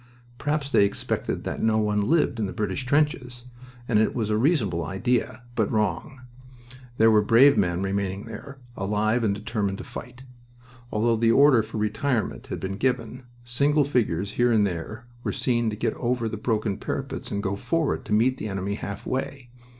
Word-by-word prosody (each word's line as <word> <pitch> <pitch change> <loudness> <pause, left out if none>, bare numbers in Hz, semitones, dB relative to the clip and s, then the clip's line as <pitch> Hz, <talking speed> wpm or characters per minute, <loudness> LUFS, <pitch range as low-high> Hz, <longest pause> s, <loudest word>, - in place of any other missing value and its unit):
Perhaps 145 -1 -1
they 100 - +5
expected 100 - -2
that - - -4
no 110 -1 +2
one 105 -1 +1
lived 120 +1 +2
in 105 - 0
the - - -6
British 105 +4 -3
trenches, 130 -4 0 0.4
and 110 -3 +3
it 110 - +1
was 110 -3 -1
a - - +2
reasonable 110 - +1
idea, 120 +5 -1
but 110 -4 0
wrong. 105 +5 -1 0.8
There 115 0 +6
were 105 -1 +5
brave 125 +7 +6
men 90 0 +1
remaining 95 0 -2
there, 115 +5 -9 0.2
alive 105 +4 0
and 100 -2 +1
determined 100 -2 -2
to - - -7
fight. 125 +1 -9 0.7
Although 115 +2 +2
the 115 0 +3
order 140 -1 +6
for 110 +1 -7
retirement 110 +2 -1
had - - -4
been 95 +1 -4
given, 125 0 -2 0.2
single 140 +5 +2
figures 100 - 0
here 120 +3 +2
and 110 -3 +4
there 100 +6 -5 0.2
were - - -1
seen 120 -3 0
to 105 - -4
get 105 - -1
over 120 -1 -1
the 110 - -4
broken 110 -2 -1
parapets - - -4
and 100 0 -3
go 95 +1 -1
forward 160 +8 -1
to 110 - -9
meet 120 +5 +3
the - - -4
enemy 95 0 -2
halfway. 125 +5 -4
110 Hz, 180 wpm, -25 LUFS, 100-125 Hz, 0.8 s, There